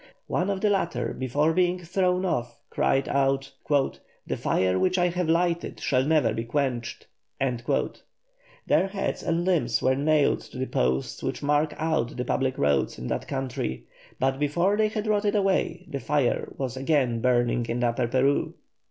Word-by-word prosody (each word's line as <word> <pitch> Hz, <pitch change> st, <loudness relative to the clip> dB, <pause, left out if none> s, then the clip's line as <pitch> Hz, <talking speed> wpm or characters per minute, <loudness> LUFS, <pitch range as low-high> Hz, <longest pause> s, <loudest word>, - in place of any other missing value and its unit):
One 185 Hz, -, -1 dB
of 195 Hz, -1 st, -1 dB
the 210 Hz, -, +3 dB
latter 190 Hz, -4 st, -1 dB
before 145 Hz, +5 st, +1 dB
being 180 Hz, +1 st, +2 dB
thrown 180 Hz, +1 st, 0 dB
off 120 Hz, -9 st, -2 dB
cried 135 Hz, 0 st, +1 dB
out: 135 Hz, 0 st, +1 dB, 0.2 s
"The 140 Hz, -2 st, -1 dB
fire 95 Hz, 0 st, +1 dB
which 185 Hz, 0 st, +2 dB
I 180 Hz, 0 st, +3 dB
have 175 Hz, -1 st, -2 dB
lighted 170 Hz, +1 st, 0 dB
shall 130 Hz, -1 st, +1 dB
never 145 Hz, -6 st, +2 dB
be 115 Hz, -, -2 dB
quenched." 120 Hz, -2 st, -2 dB, 0.3 s
Their -, -, -2 dB
heads 195 Hz, 0 st, -3 dB
and 170 Hz, +1 st, 0 dB
limbs 155 Hz, -11 st, +2 dB
were 130 Hz, -, +2 dB
nailed 145 Hz, +2 st, +2 dB
to -, -, -12 dB
the 130 Hz, -, -1 dB
posts 65 Hz, -, -1 dB
which -, -, -3 dB
mark 150 Hz, +1 st, +1 dB
out 155 Hz, -8 st, -1 dB
the 125 Hz, -, -2 dB
public 130 Hz, +1 st, 0 dB
roads 70 Hz, -3 st, +1 dB
in -, -, -7 dB
that -, -, -3 dB
country, 130 Hz, -, -3 dB, 0.4 s
but 135 Hz, +1 st, +1 dB
before 170 Hz, +7 st, +2 dB
they 215 Hz, 0 st, +3 dB
had 215 Hz, 0 st, -3 dB
rotted 210 Hz, -1 st, +1 dB
away 190 Hz, -2 st, +1 dB
the 140 Hz, -, -4 dB
fire 145 Hz, -2 st, 0 dB
was 130 Hz, -2 st, -3 dB
again 130 Hz, -4 st, +1 dB
burning 120 Hz, -1 st, +2 dB
in 120 Hz, +1 st, -1 dB
Upper 120 Hz, 0 st, +1 dB
Peru. 130 Hz, +4 st, +1 dB
145 Hz, 165 wpm, -26 LUFS, 125-180 Hz, 0.4 s, the